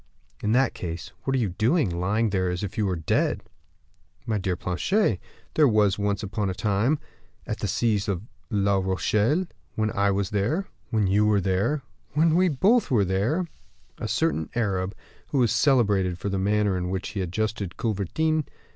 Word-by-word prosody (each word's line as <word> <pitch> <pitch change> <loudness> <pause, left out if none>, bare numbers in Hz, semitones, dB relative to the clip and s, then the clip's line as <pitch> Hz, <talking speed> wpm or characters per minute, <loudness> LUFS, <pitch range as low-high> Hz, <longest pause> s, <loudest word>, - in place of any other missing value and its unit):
"In 105 - 0
that 130 +1 +3
case, 85 -1 -6
what 135 - +1
are - - +2
you 110 -5 +1
doing, 120 - +2
lying 105 +4 +1
there, 95 -2 +1
as 90 +2 -3
if 100 - -4
you 105 -3 +1
were 95 - 0
dead?" 80 -2 0 0.8
"My 110 -3 0
dear 95 -2 -1
Planchet, 100 - +1 0.3
there 150 -2 +5
was, 105 -4 +3
once 100 0 0
upon 100 0 -2
a 95 - -3
time, 105 +8 +1 0.5
at - - -4
the - - -1
siege 105 -4 +1
of 100 -2 -2 0.3
La 100 -3 +2
Rochelle, 105 - +1 0.3
when 110 0 0
I 100 0 +2
was 100 -1 0
there, 115 - 0 0.2
when 110 -2 +1
you 105 +3 +3
were 105 -1 +4
there, 100 +10 0 0.3
when 155 +2 +3
we 185 +1 +4
both 200 - +3
were 110 -6 +3
there, 105 - 0 0.5
a - - -3
certain 80 +2 0
Arab, 100 -4 -1 0.3
who 145 - -2
was 120 -4 +3
celebrated 105 - +3
for 100 - -3
the 95 -1 -1
manner 105 0 +2
in 90 0 -3
which 95 0 -3
he 100 - -3
adjusted 100 +1 -2
culverins. 135 - 0
105 Hz, 180 wpm, -25 LUFS, 95-120 Hz, 0.8 s, there